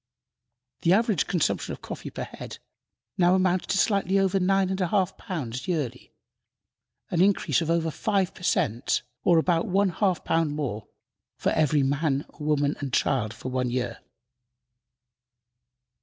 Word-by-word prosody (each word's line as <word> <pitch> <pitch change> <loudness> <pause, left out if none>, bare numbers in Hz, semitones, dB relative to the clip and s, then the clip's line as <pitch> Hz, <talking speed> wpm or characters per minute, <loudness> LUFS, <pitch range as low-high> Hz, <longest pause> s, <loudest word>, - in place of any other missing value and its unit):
The 170 - +4
average 215 -2 +2
consumption 175 -6 0
of - - -11
coffee - - -6
per - - -5
head - - -9 0.6
now 175 +1 +5
amounts 185 -1 +1
to 200 - 0
slightly 195 -2 +2
over 195 0 +2
nine 190 0 +2
and 190 0 -2
a 180 - +2
half 190 0 +1
pounds 130 - -5
yearly, 140 -8 -3 1.0
an 170 - +2
increase 195 -2 +3
of 165 - -2
over 165 -1 +1
five 195 +1 0
per - - -15
cent., 120 -9 0 0.2
or 175 - +5
about 165 0 +2
one 195 +1 +2
half 185 0 0
pound 165 -3 +1
more 110 -8 -4 0.5
for - - 0
every 150 -2 +2
man, 140 +1 0
woman 150 -1 +1
and 135 -3 -5
child 120 -7 +1
for 125 - -7
one 125 -1 -1
year. 125 -1 -2
165 Hz, 150 wpm, -26 LUFS, 140-190 Hz, 1.0 s, now